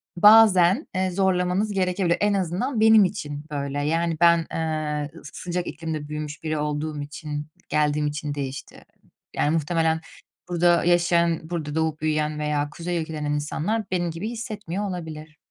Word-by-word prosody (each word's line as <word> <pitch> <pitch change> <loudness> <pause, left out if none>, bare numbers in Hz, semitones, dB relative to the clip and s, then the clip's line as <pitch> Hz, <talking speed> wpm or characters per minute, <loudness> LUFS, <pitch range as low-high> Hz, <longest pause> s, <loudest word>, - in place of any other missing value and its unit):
bazen, 210 - +6
eee, 185 0 0
zorlamanız 190 +2 +1
gerekebilir. 185 -2 +1
En 205 0 +3
azından 195 - -1
benim 220 -2 +7
için 150 -6 -5
böyle. 140 0 -2
Yani, 165 +2 0
ben, 170 0 +7 0.2
eee, 155 -2 -2
s 145 - -9
sıcak 180 0 -4
iklimde 155 -1 -5
büyümüş 150 +1 -6
biri 155 -1 -1
olduğum 150 0 -2
için, 150 0 -6 0.2
geldiğim 150 0 +1
için 150 0 -3
değişti. 140 -1 -6 0.5
Yani, 145 - +1
muhtemelen 160 0 +1 0.5
burada 175 0 +3
yaşayan, 170 -1 +3
burada 155 -4 -4
doğup 160 -1 -1
büyüyen 155 -1 0
veya 150 -1 -1
kuzey 175 +2 -3
ülkelerinden 155 -2 -4
insanlar 160 +9 -1
benim 175 -2 0
gibi 170 +7 -4
hissetmiyor 210 -4 -4
olabilir. 155 -3 -7
160 Hz, 145 wpm, -24 LUFS, 150-180 Hz, 0.5 s, benim